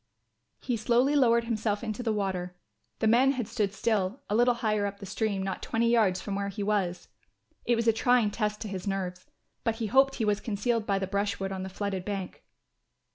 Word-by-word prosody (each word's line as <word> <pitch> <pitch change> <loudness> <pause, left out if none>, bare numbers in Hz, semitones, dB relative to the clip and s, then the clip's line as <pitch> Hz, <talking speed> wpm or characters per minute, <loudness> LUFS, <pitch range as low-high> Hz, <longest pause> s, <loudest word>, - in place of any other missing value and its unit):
He 245 -3 -1
slowly 245 +6 +2
lowered 235 -4 +4
himself 220 -2 -1
into 220 0 -3
the 230 -2 0
water. 185 -4 -2 0.4
The 220 - +1
men 255 +5 +5
had 245 -5 -3
stood 215 -4 -1
still, 210 +1 -1
a - - +2
little 240 +1 +4
higher 215 -3 0
up 200 0 -7
the 200 - -8
stream, 200 0 -1
not 190 -1 -3
twenty 230 +1 +1
yards 205 -6 +3
from 200 - -5
where 200 0 -2
he 200 +1 -4
was. 195 -4 -1 0.6
It 240 - +3
was 230 0 -1
a 225 - +6
trying 240 -1 +3
test 210 -1 -2
to 220 - -4
his 190 -1 -5
nerves, 185 -2 -3 0.4
but 230 -2 0
he 225 0 -3
hoped 270 +5 +4
he 225 - -1
was 210 -1 +1
concealed 220 +1 -1
by 200 -1 +2
the 195 - -1
brushwood 200 0 -2
on 190 -1 -4
the 190 - -5
flooded 195 -1 -3
bank. 195 -2 -5
210 Hz, 210 wpm, -28 LUFS, 195-230 Hz, 0.6 s, a